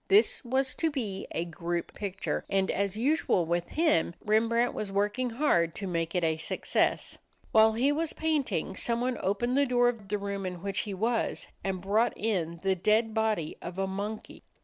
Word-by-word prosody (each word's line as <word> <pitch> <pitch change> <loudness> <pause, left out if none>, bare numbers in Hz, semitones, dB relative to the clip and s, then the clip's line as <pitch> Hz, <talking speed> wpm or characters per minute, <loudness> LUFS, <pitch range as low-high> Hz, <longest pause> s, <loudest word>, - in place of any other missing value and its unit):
This 410 -4 +4
was 260 +1 +2
to 325 - +2
be 220 -10 -4
a 170 - -2
group 170 +1 -4
picture, 195 -2 -3
and 195 -1 +1
as 200 +1 -1
usual 250 - +2
with 170 +1 -1
him, 305 - +2
Rembrandt 230 +3 +2
was 205 -2 -4
working 205 +6 0
hard 200 - +2
to 200 - -5
make 165 -1 -2
it 180 - +1
a 160 -1 +1
success. 155 - 0 0.3
While 220 0 +6
he 255 +6 +2
was 315 +2 -1
painting, 295 - -1
someone 240 +4 0
opened 210 +6 0
the 280 0 +3
door 245 -1 +4
of 225 -5 -6
the 210 - 0
room 200 -1 -4
in 180 -1 -5
which 200 -1 -1
he - - -3
was 230 +4 0 0.2
and 190 -2 -2
brought 210 +5 +1
in 170 -6 -1
the 195 0 +3
dead 215 +4 +2
body 215 -8 0
of 175 +1 -7
a 195 - +1
monkey. 205 +3 -5
210 Hz, 185 wpm, -29 LUFS, 185-245 Hz, 0.3 s, While